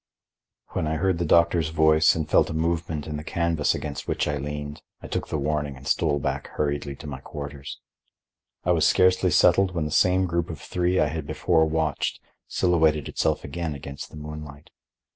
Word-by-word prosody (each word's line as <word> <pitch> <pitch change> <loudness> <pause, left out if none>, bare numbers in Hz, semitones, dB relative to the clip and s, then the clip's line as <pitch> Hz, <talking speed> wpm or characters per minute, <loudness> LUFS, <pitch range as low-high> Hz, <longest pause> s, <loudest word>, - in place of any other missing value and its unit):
When 80 - -2
I 80 - -1
heard 90 +2 +1
the 85 - 0
doctor's 85 -1 +3
voice 80 0 +4
and 80 -2 -2
felt - - +3
a 80 - -4
movement 80 -2 -1
in 75 -1 -4
the 75 - -6
canvas 85 -2 0
against 70 -2 -5
which - - 0
I 75 -1 -1
leaned, 75 +1 -5 0.2
I - - -12
took - - -3
the - - -2
warning 75 -1 -2
and 65 +1 -11
stole 75 -3 +2
back 70 0 -3
hurriedly 70 -1 -1
to - - -12
my 70 -3 -6
quarters. 70 0 -8 0.8
I 90 - +2
was 80 -3 +4
scarcely 90 0 +4
settled, 95 -2 +4
when 80 -3 0
the 75 - -4
same 90 +4 +3
group 85 -1 -1
of 80 -4 -6
three 90 +3 0
I 75 - +3
had 80 -2 -5
before 80 0 +2
watched 80 -2 -1 0.3
silhouetted 80 -5 +2
itself - - 0
again 80 +1 -4
against 70 0 -8
the - - -11
moonlight. 75 -1 -9
75 Hz, 190 wpm, -25 LUFS, 75-85 Hz, 0.8 s, voice